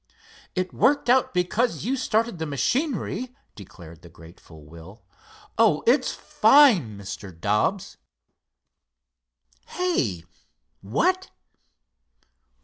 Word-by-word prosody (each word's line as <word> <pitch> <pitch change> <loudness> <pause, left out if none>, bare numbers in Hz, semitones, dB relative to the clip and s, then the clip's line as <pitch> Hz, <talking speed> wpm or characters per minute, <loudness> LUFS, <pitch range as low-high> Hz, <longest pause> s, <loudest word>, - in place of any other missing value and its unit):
"It 185 -1 -3
worked 280 -2 +2
out 260 0 +2
because 200 +8 -1
you 260 +3 0
started 230 -6 -1
the 160 - -3
machinery," 250 - -2 0.2
declared 85 -5 -14
the 85 - -15
grateful 80 -2 -16
Will. 85 +7 -14 0.6
"Oh, - - +3
it's - - +2
fine, 220 - +3
Mr. 100 -3 -9
Dobbs." 105 - -1 1.7
"Hey! 135 - -2 0.6
what? 365 - -1
175 Hz, 90 wpm, -24 LUFS, -, 1.7 s, Oh